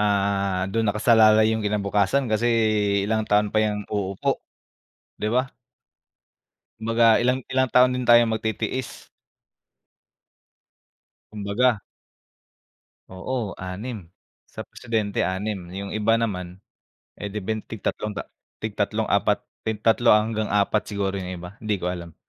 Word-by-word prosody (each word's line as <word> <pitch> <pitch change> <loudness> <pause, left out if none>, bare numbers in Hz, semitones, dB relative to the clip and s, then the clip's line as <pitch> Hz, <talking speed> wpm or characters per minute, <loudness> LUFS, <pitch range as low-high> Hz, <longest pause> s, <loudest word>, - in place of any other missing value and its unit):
ah, 100 -2 +1
dun 115 +3 0
nakasalalay 110 0 +5
'yung 110 -1 -2
kinabukasan 105 +5 +1
kasi 110 +2 +1 0.6
ilang 110 +1 0
taon 105 0 +2
pa 110 - +2
'yan 105 -1 -3
uupo. 100 -2 -2 0.7
'Di 105 - -2
ba? 130 +1 +1 1.3
Kumbaga 115 0 +4
ilang 125 +2 +1
ilang 130 0 +2
taon 125 0 +5
din 125 -1 -2
tayong 120 -1 +6
magtitiis. 110 +3 -3 2.2
Kumbaga. 105 +3 +1 1.3
Oo 105 +3 -4
6 100 +3 -6 0.5
sa - - -8
presidente 110 -4 -2
6 100 +3 -2 0.2
'yung 100 +1 -5
iba 115 +2 +2
naman, 90 -5 -4 0.6
eh, 105 - -4
di 105 0 -5
ben 110 +2 -2
tig 110 -3 -9
3 105 - -2
ta 100 - -4 0.4
tig - - -2
3-4 - - +1 0.3
tig 110 -1 -3
3 115 0 +5
hanggang 110 0 0
4 105 +1 +2
siguro 100 -1 -2
'yung 90 -1 -5
iba 90 0 -8
hindi 110 -1 -1
ko 90 -2 -2
alam, 85 -2 -8
105 Hz, 125 wpm, -24 LUFS, 100-115 Hz, 2.2 s, tayong